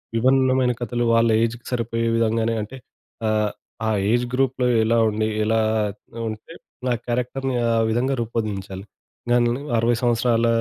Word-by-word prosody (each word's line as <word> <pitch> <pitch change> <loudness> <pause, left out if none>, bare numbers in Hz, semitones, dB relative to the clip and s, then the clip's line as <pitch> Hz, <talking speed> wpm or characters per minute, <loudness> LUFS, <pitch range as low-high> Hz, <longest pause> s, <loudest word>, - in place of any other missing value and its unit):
విభిన్నమైన 130 +1 +3
కథలు 120 0 -1
వాళ్ళ 115 0 +4
ఏజ్‌కి 115 +1 -3
సరిపోయే 115 -1 -1
విధంగానే 115 0 +1
అంటే 110 +6 -7 0.5
ఆహ్, 105 -1 +1 0.4
ఆ - - +2 0.2
ఏజ్ 120 +1 +2
గ్రూప్‌లో 130 -1 +1 0.2
ఎలా 115 +1 +2
ఉండి 110 +1 -1 0.2
ఎలా 110 +1 +2 0.7
ఉంటే 110 +9 -9 0.3
నా 125 - +2
క్యారెక్టర్‌ని 125 +2 -2
ఆ - - +2 0.2
విధంగా 125 +4 +1
రూపొందించాలి. 105 -4 -4 0.5
గనునాయి 120 +3 +2
60 115 +1 +2
సంవత్సరాల 120 -1 +2
115 Hz, 130 wpm, -22 LUFS, 110-125 Hz, 0.7 s, వాళ్ళ